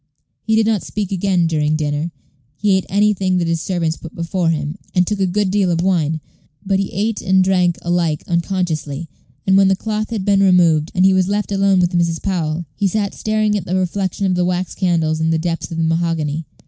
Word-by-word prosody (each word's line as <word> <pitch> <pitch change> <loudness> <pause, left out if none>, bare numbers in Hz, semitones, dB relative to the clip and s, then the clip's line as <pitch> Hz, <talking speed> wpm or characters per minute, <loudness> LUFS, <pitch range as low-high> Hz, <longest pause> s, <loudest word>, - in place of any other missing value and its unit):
He 220 0 0
did 220 0 +3
not 215 -3 +1
speak 205 -3 -4
again 185 -2 +1
during 155 -2 +1
dinner. 150 +2 -2 0.5
He 205 -1 +1
ate 190 - -1
anything 195 -2 +2
that 170 -2 0
his 165 -1 0
servants 170 -3 -1
put 165 - -11
before 170 0 -1
him, 155 +2 -2 0.2
and 180 0 +4
took 210 +2 -2
a 190 - +2
good 195 +1 0
deal 200 -2 +2
of 170 -1 0
wine; 160 -4 +1 0.4
but 195 0 +1
he 195 - -2
ate 215 +3 -1
and 190 0 +3
drank 180 -2 +2
alike 170 -3 0
unconsciously, 170 -4 -2 0.4
and 190 - +3
when 195 0 +5
the 195 - +3
cloth 215 +2 -3
had 215 -5 -3
been 200 -1 +3
removed, 170 -5 +4
and 185 0 +4
he 190 - +5
was 185 -1 +2
left 205 +1 -1
alone 195 -1 +3
with 175 0 +1
Mrs. 170 -1 +1
Powell, 170 -3 -2
he 200 - +1
sat 200 +1 -1
staring 215 -1 0
at 200 - -2
the 180 - -2
reflection 190 +1 -1
of 185 - +2
the 180 0 +1
wax 180 0 -1
candles 160 -4 0
in 160 - +1
the 165 - +2
depths 165 +1 -3
of 165 - -6
the 165 - 0
mahogany. 165 -2 -1
180 Hz, 220 wpm, -18 LUFS, 165-195 Hz, 0.5 s, when